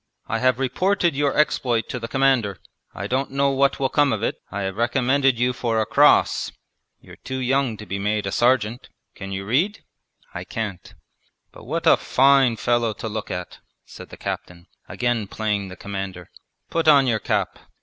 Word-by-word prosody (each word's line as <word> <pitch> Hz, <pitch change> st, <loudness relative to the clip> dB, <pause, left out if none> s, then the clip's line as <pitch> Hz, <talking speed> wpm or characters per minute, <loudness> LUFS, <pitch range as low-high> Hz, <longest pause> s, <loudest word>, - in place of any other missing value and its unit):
'I -, -, -1 dB
have 130 Hz, -2 st, +2 dB
reported 175 Hz, +6 st, +1 dB
your 140 Hz, -1 st, 0 dB
exploit 125 Hz, -6 st, +1 dB
to 125 Hz, -, -4 dB
the 115 Hz, -, -5 dB
Commander. 130 Hz, -6 st, +1 dB, 0.3 s
I 100 Hz, -, -6 dB
don't 130 Hz, +6 st, -1 dB
know 140 Hz, +1 st, +1 dB
what 135 Hz, 0 st, +1 dB
will 135 Hz, -1 st, +1 dB
come 145 Hz, -1 st, +3 dB
of 110 Hz, -1 st, -2 dB
it. -, -, -2 dB
I 100 Hz, -, -4 dB
have 95 Hz, 0 st, -3 dB
recommended 130 Hz, +2 st, +2 dB
you 125 Hz, +1 st, +1 dB
for 115 Hz, -2 st, -1 dB
a 110 Hz, -, +1 dB
cross; -, -, +3 dB, 0.5 s
you're -, -, -15 dB
too 130 Hz, -, -6 dB
young 130 Hz, -2 st, 0 dB
to 105 Hz, -, -9 dB
be 100 Hz, -1 st, -4 dB
made 105 Hz, +1 st, -1 dB
a 95 Hz, -, -2 dB
sergeant. 120 Hz, 0 st, +1 dB, 0.2 s
Can 100 Hz, -1 st, -8 dB
you 95 Hz, 0 st, -4 dB
read?' 165 Hz, -, 0 dB, 0.5 s
'I -, -, -6 dB
can't.' 105 Hz, -5 st, -6 dB, 0.6 s
'But -, -, -14 dB
what -, -, -3 dB
a -, -, +6 dB
fine 135 Hz, -2 st, +4 dB
fellow 120 Hz, -2 st, +1 dB
to 115 Hz, -, -6 dB
look 110 Hz, -1 st, -5 dB
at!' 90 Hz, 0 st, -6 dB, 0.3 s
said -, -, -12 dB
the -, -, -11 dB
captain, 85 Hz, 0 st, -6 dB, 0.2 s
again 120 Hz, -4 st, -1 dB
playing 105 Hz, -1 st, -2 dB
the 95 Hz, -, -9 dB
commander. 95 Hz, -3 st, -6 dB, 0.4 s
'Put 165 Hz, -1 st, 0 dB
on 140 Hz, -3 st, +7 dB
your 115 Hz, -4 st, +1 dB
cap. -, -, -2 dB
120 Hz, 185 wpm, -22 LUFS, 105-135 Hz, 0.6 s, on